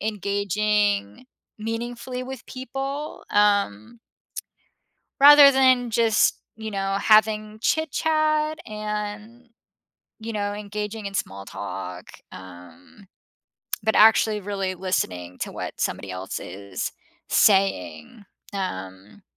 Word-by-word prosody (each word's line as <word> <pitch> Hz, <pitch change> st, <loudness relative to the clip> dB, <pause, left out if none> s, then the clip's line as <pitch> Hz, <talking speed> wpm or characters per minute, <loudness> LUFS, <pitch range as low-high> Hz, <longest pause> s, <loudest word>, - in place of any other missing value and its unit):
engaging 205 Hz, +2 st, -1 dB, 0.3 s
meaningfully 235 Hz, +3 st, -5 dB
with 260 Hz, -2 st, -8 dB
people, 270 Hz, +3 st, -6 dB
um 205 Hz, -, +1 dB, 1.2 s
rather 290 Hz, 0 st, +10 dB
than 255 Hz, -3 st, +3 dB
just, 225 Hz, -1 st, +3 dB, 0.2 s
you 220 Hz, -1 st, -6 dB
know, 195 Hz, 0 st, -1 dB
having 215 Hz, 0 st, +3 dB
chit-chat 310 Hz, 0 st, +1 dB
and, 210 Hz, +2 st, -6 dB, 0.7 s
you 225 Hz, 0 st, -6 dB
know, 205 Hz, -1 st, -2 dB
engaging 210 Hz, +1 st, -5 dB
in 200 Hz, -, -8 dB
small 100 Hz, -, -4 dB
talk, 90 Hz, -3 st, -7 dB, 0.3 s
um, 90 Hz, -, -14 dB, 0.8 s
but 220 Hz, -, +1 dB
actually 215 Hz, 0 st, +5 dB
really 195 Hz, -1 st, -3 dB
listening 90 Hz, -, -3 dB
to -, -, -4 dB
what -, -, -6 dB
somebody 100 Hz, -2 st, -3 dB
else 95 Hz, +1 st, -5 dB
is 95 Hz, +1 st, -6 dB, 0.4 s
saying, 190 Hz, -, +1 dB, 0.3 s
um 100 Hz, -, -6 dB
210 Hz, 95 wpm, -24 LUFS, 185-235 Hz, 1.2 s, rather